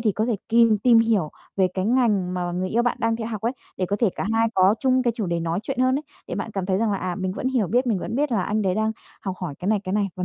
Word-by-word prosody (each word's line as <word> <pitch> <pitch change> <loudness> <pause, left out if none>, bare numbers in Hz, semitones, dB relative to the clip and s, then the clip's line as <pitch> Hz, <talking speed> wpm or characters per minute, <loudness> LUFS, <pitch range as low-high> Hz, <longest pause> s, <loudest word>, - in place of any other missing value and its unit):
thì 220 -3 +2
có 215 - 0
thể 235 - 0
kìm 230 -2 +5
tìm 235 +1 +5
hiểu 215 -9 +2 0.3
về 190 -1 +3
cái 185 0 -1
ngành 210 -7 +2
mà 175 -1 -2
người 185 +1 -2
yêu 235 +5 +1
bạn 245 - 0 0.2
theo 225 - -3
học 215 -3 -4
ấy, 235 - 0 0.2
để 185 - -1
có 200 - -1
thể 230 -5 +3
cả 190 - -3
hai 225 0 +3
có 190 +2 +5
chung 260 -1 +3
cái 240 -2 +1
chủ 210 -5 -2
đề 170 -1 -1
nói 165 +2 -1
chuyện 235 - -4
hơn 255 0 +3
ấy, - - -7 0.2
để - - -4
bạn - - -4
cảm 195 -3 -3
thấy 190 0 +1
rằng 220 -2 +1
là, 195 - -1
à, 180 -1 -3
mình 185 0 -3
vẫn 250 +6 -2
hiểu 250 -6 +1
biết, 245 +8 +1
mình 220 -6 +1
vẫn - - -5
biết 285 +1 0
là 200 -5 +2
anh 215 +2 -1
đấy 185 -2 +1
đang 220 +1 0 0.3
học 190 -2 -4
hỏi 170 -6 -4
cái 185 - -3
này, 215 -1 +2
cái 185 - -3
này 205 -1 +1
và 180 - -2
210 Hz, 320 wpm, -23 LUFS, 185-230 Hz, 0.3 s, kìm